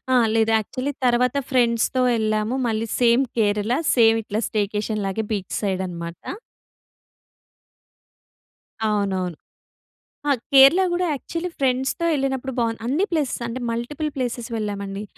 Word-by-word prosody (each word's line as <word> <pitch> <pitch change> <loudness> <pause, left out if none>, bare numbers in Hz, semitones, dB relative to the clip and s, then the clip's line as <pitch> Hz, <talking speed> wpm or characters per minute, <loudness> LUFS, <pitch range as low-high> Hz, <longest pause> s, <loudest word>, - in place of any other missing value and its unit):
ఆహ్, 240 -2 +4
లేదు. 225 0 +2
యాక్చువల్లీ 255 +6 -3
తర్వాత 250 +2 +2
ఫ్రెండ్స్‌తో 245 0 +2 0.2
ఎళ్ళాము. 215 +2 0
మళ్ళీ 225 0 -1
సేమ్ 240 +2 +4
కేరళ 210 +2 +1 0.2
సేమ్ 225 -2 +5
ఇట్లా 210 +1 -3
స్టేకేషన్ 210 0 -1
లాగే 205 +3 -2
బీచ్ 195 -3 -4
సైడ్ 190 -2 -1
అనమాట. 170 -1 -6 2.7
అవునవును. 190 -5 -1 0.9
ఆహ్ 275 -4 +2
కేరళ 275 +7 +8
గూడా 355 +1 0
యాక్చువల్లీ 335 +5 -4
ఫ్రెండ్స్‌తో 265 +5 0
ఎళ్ళినప్పుడు 265 -1 -2
బాగుంది. 230 -1 -1
అన్ని 295 +11 +1
ప్లేసెస్ 295 -7 -1
అంటే 235 +2 -5
మల్టిపుల్ 280 +7 -3
ప్లేస్ 250 -3 -2 0.2
వెళ్ళామండి. 200 -2 -4
230 Hz, 120 wpm, -23 LUFS, 210-265 Hz, 2.7 s, కేరళ